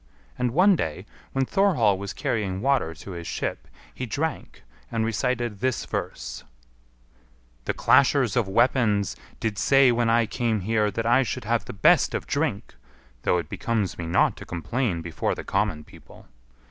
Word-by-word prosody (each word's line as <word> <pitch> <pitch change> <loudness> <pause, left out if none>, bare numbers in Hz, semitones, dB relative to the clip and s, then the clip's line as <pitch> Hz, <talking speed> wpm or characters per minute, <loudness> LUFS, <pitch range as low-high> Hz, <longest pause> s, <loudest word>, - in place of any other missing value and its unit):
And 125 0 0
one 185 - +5
day, 90 - -3 0.3
when 135 0 0
Thorhall 155 - +3
was 100 0 -5
carrying 95 -4 -2
water 130 -9 +1
to 100 - -10
his 85 -2 -7
ship, - - -4 0.3
he 130 - -5
drank, 150 +7 -4 0.3
and 115 -1 0
recited 120 -1 -1
this 130 0 -1
verse: - - -5 1.2
"The - - -1
clashers 130 -5 +4
of 120 -5 +1
weapons 105 - +2 0.2
did 110 -2 -2
say 135 -2 +5
when 120 -1 +1
I 115 0 +4
came 110 -1 -1
here 105 +2 +1
that 115 +3 -3
I 120 +3 +4
should 125 - -3
have 115 +1 0
the - - -7
best 95 - +4
of - - -3
drink - - -2 0.5
(though 90 - +2
it 85 - -3
becomes 110 -7 -2
me 85 - -4
not 85 - +3
to - - -8
complain 90 - -2
before 85 -1 -2
the - - -6
common 95 -6 -1
people). - - -16
115 Hz, 165 wpm, -25 LUFS, 95-125 Hz, 1.2 s, one